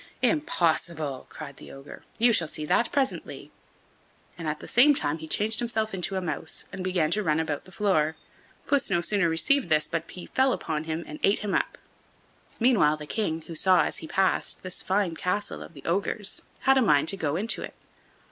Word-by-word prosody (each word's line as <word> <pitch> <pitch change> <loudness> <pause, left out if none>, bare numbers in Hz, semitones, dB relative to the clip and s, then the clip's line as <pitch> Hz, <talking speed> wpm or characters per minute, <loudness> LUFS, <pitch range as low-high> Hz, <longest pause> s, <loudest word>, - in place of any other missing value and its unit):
"Impossible!" 170 - 0
cried 140 -3 -9
the - - -12
ogre; 135 +1 -11
"you 235 +1 +4
shall 170 -6 +1
see 150 0 -5
that 235 - +2
presently." 270 -2 -2 0.8
And 165 -2 -6
at 150 0 -2
the - - -10
same 285 +5 +5
time 150 - -1
he 160 - -8
changed 215 +7 +3
himself 220 -3 0
into 190 +1 -2
a 190 - -1
mouse, 160 -2 -3
and 185 0 -5
began 180 -4 +1
to 210 - +2
run 160 -5 +1
about 155 -3 -3
the 185 - -13
floor. 160 -6 +1 0.5
Puss 285 -4 +1
no 175 -3 +2
sooner 175 0 +2
perceived 275 - +2
this 150 -1 +3
but 165 0 -3
he 180 - -8
fell 260 0 +2
upon 155 -1 -3
him 160 +1 -3
and 150 - -9
ate 205 +1 +2
him 205 - -2
up. - - 0 0.8
Meanwhile 220 -11 +4
the 150 - -8
King, 165 -3 -2
who 165 - -9
saw, 185 +3 +4
as - - -2
he 160 - -8
passed, 190 +2 +1
this 185 -1 -3
fine 190 -2 0
castle 180 +5 -2
of 165 - -11
the 140 - -13
ogre's, 195 +3 -1 0.2
had 270 0 +4
a - - +3
mind 150 - +3
to - - 0
go 155 -4 -1
into 215 +6 -1
it. - - -7
180 Hz, 205 wpm, -27 LUFS, 155-210 Hz, 0.8 s, same